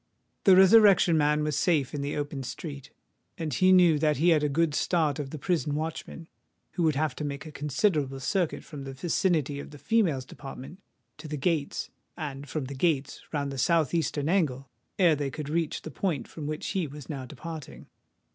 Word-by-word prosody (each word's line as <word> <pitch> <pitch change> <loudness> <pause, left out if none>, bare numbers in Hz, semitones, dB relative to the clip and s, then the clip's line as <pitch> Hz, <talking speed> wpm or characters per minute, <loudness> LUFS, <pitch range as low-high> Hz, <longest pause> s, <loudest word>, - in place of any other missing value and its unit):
The 190 -3 +8
Resurrection 190 -2 +7
Man 150 0 +2
was 150 -2 -1
safe 150 -3 +1
in 145 - -3
the 140 +1 -3
open 145 -1 -3
street; 140 +1 -7 0.5
and 160 -5 -3
he 185 +7 +4
knew 175 -5 +6
that 150 0 +2
he 165 +5 +3
had 160 -3 +4
a 150 - +2
good 160 +1 +1
start 155 -2 +1
of 140 -2 -4
the 155 - -6
prison 155 -1 -1
watchmen, 160 +1 -5 0.4
who - - -3
would 160 -3 +3
have 155 +2 0
to - - -4
make 140 0 -4
a 155 - -8
considerable 145 -1 0
circuit 175 +4 -1
from 145 -3 -9
the 135 0 -7
vicinity 155 -1 0
of - - -8
the 150 - -12
females' 165 - +1
department 135 +6 -10 0.4
to 155 - -8
the 150 0 -4
gates, 150 -1 -1 0.3
and 145 -3 -6
from 150 -2 -3
the 135 - -6
gates 145 -1 0
round 140 -2 -2
the 135 - -5
south 160 0 +2
eastern 155 -3 0
angle, 140 -8 0 0.3
ere 175 -5 +5
they 145 -1 -2
could 150 +1 -6
reach 165 0 -1
the 155 - -7
point 150 -5 -2
from 150 -3 -7
which 155 0 -4
he 185 -5 -1
was 145 -1 -10
now 135 -4 -5
departing. 155 +1 -8
150 Hz, 200 wpm, -28 LUFS, 140-165 Hz, 0.5 s, The